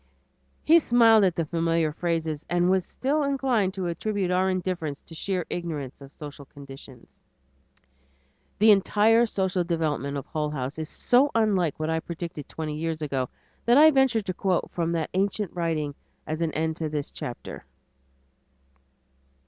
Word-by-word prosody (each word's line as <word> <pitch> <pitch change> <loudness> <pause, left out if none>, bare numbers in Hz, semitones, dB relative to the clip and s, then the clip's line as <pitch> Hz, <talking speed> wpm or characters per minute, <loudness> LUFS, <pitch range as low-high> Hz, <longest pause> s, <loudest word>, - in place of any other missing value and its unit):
He 330 +2 +6
smiled 230 -6 +5
at 180 -2 +1
the 165 - -1
familiar 165 -1 0
phrases 165 -2 -2
and 175 +1 +2
was 190 -1 +1
still 285 +4 -1
inclined 260 -9 0
to 190 -2 -3
attribute 190 +2 -2
our 185 +1 +2
indifference 180 -6 -2
to - - -14
sheer 180 +1 -2
ignorance 150 -7 -5
of 135 0 -12
social 145 -1 -10
conditions. 135 -3 -14 1.4
The 215 +1 +6
entire 215 +3 +4
social 190 -3 0
development 155 -4 -1
of 140 - -5
Hull 150 -1 -2
House 140 0 -4
is 155 - -4
so 260 +4 +3
unlike 195 -10 +1
what 155 +1 -1
I 160 - +1
predicted 165 -2 -7
twenty 155 -2 -4
years 160 0 -3
ago, 135 -4 -2 0.4
that 240 +2 +5
I 310 +2 +8
venture 265 -6 +3
to 185 -2 -3
quote 185 -1 -1
from 170 -1 -1
that 165 -2 -2
ancient 200 0 -1
writing 160 -4 -1 0.3
as 155 +2 -4
an 165 -1 0
end 160 0 -1
to 160 -2 -2
this 150 -1 -3
chapter. 120 - -7
170 Hz, 155 wpm, -26 LUFS, 155-200 Hz, 1.4 s, I